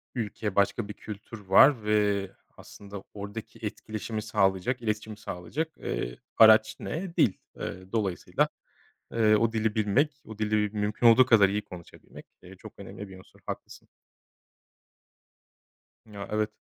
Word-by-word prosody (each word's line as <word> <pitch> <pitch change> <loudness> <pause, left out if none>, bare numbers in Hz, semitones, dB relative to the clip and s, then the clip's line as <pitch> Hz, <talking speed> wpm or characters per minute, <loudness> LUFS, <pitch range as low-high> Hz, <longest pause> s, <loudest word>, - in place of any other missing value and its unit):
ülke, 105 -3 -3
başka 100 +2 +1
bir 105 - -6
kültür 105 +2 -9
var 110 +6 +6
ve 105 -2 +1 0.3
aslında 100 -1 -11
oradaki 100 +2 -8
etkileşimi 110 +1 -5
sağlayacak, 105 +3 0
iletişimi 110 -1 -3
sağlayacak, 120 - -5
eee, - - -4 0.2
araç 110 -1 +7
ne? 170 +1 -5
Dil. 115 - +4 0.3
Eee, 95 +1 -6
dolayısıyla, 100 -6 0 0.7
eee, 110 -2 +4
o 115 +1 +1
dili 110 -1 0
bilmek, 135 +8 +1
o 110 -1 -10
dili 110 0 0
m 105 0 -5
mümkün 105 +3 +1
olduğu 115 +2 +7
kadar 105 -6 +6
iyi 105 +1 -1
konuşabilmek, 85 -2 -13 0.2
eee, - - -13
çok - - -12
önemli 105 - -9
bir 95 -1 -12
unsur. 95 - -19
Haklısın. - - -8 2.2
Ya 100 -2 -8
evet. 105 0 0
105 Hz, 135 wpm, -28 LUFS, 100-115 Hz, 2.2 s, araç